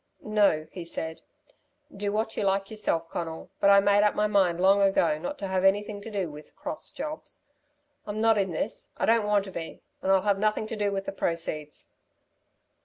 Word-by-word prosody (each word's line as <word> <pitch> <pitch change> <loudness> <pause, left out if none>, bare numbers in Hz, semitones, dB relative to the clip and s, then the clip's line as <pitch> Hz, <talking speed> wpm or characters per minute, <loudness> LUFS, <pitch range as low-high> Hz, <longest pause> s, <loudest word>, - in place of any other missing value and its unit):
"No," 205 -8 +2
he 180 - -7
said. 160 -1 -5 0.7
"Do 200 +1 -2
what 220 +1 -1
you - - -2
like 195 0 0
yourself, 170 -6 -1
Conal, 165 +1 -5
but 200 - +4
I 200 0 +8
made 200 +1 +4
up 210 0 +3
my 210 - +2
mind 190 -5 +2
long 195 +2 +5
ago 195 -6 +3
not 235 - -4
to 200 - -4
have 190 0 0
anything 205 +1 +2
to 225 - -8
do 195 -6 -2
with 150 +1 -13
'cross' 300 +1 -6
jobs. 310 0 -7 0.6
I'm 210 +1 -3
not 225 -1 +4
in 195 -1 +1
this. 170 +6 -4
I - - +1
don't 225 -2 +3
want 205 -1 +3
to 190 - -8
be 165 -2 -7 0.2
and 190 - +1
I'll 190 -1 +4
have 200 -1 +2
nothing 215 +1 +1
to 220 - -5
do 205 -1 0
with 195 -1 -3
the - - -3
proceeds." 165 -5 -3
200 Hz, 205 wpm, -27 LUFS, 180-210 Hz, 0.7 s, I